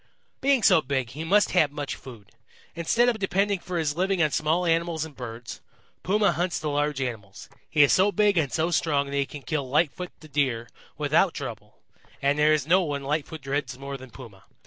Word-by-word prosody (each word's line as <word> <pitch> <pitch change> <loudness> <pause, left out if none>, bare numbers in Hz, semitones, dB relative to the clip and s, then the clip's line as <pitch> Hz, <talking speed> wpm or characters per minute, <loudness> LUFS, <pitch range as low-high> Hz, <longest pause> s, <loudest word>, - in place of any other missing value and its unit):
"Being 270 -4 +3
so 185 -5 +6
big, 130 -4 -2
he 150 +5 -6
must 200 +5 +3
have 155 -6 +3
much 145 -1 -4
food. 115 -6 -13 0.4
Instead 230 +9 +2
of 235 -3 +1
depending 195 0 +1
for 180 0 -5
his 150 -3 -1
living 190 +2 0
on 155 - +1
small 160 +4 +1
animals 165 -1 0
and 155 -3 -12
birds, 115 -1 -8 0.4
Puma 200 +1 +2
hunts 175 +1 -1
the 155 - -3
large 145 -1 0
animals. 110 -7 -6 0.2
He 150 - +5
is 140 - +4
so 195 +2 +4
big 205 +1 +3
and 155 -6 +1
so 165 +2 0
strong 145 -4 +1
that - - -3
he 140 -1 0
can 145 -2 -9
kill 145 -5 -3
Lightfoot 165 +5 0
the 155 - -13
Deer 130 -6 -1 0.3
without - - +2
trouble, - - -7 0.4
and 140 +1 +1
there 150 +1 +5
is 155 -3 +2
no 180 +4 +4
one 145 -5 -3
Lightfoot 150 +1 -3
dreads 135 -2 -3
more 140 +1 -6
than 130 -1 -10
Puma. 115 -8 -13
150 Hz, 205 wpm, -26 LUFS, 140-175 Hz, 0.4 s, so